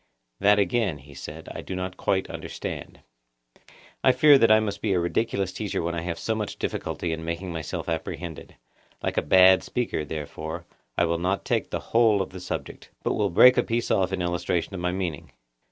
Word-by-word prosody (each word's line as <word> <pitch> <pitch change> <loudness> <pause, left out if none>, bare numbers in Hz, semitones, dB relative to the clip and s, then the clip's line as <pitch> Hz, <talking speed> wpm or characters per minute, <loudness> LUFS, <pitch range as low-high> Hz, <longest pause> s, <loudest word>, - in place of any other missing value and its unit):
That 105 +1 +5
again, 100 -3 +1
he 70 +1 -15
said, 70 - -9
I - - -6
do 95 - -6
not 95 0 -4
quite 95 0 0
understand. - - -7 1.0
I 130 - +7
fear 145 +1 +6
that 115 - +5
I 110 0 +7
must 100 -2 -3
be 105 -3 +1
a 90 - +2
ridiculous 95 +1 -1
teacher 100 -3 -3
when 85 +1 -2
I 85 - -2
have 85 -1 -4
so 110 - -1
much 105 -2 -4
difficulty 85 - -3
in 80 0 -4
making 85 +2 -4
myself 80 -3 -5
apprehended. 80 0 -5 0.5
Like - - -2
a - - +4
bad 95 +4 +6
speaker, 120 -10 -2
therefore, 80 +2 -6 0.3
I 85 - +4
will 85 0 0
not 95 +3 -1
take - - 0
the - - -2
whole 110 -4 +5
of - - -10
the 95 - -8
subject, 90 - -6
but - - +1
will 105 -2 +1
break 125 +8 +7
a - - +4
piece 115 +1 -1
off 95 -1 +2
in 95 -2 -1
illustration 85 +1 -1
of 95 - -4
my 90 0 0
meaning. 90 -5 -4
90 Hz, 200 wpm, -26 LUFS, 85-100 Hz, 1.0 s, I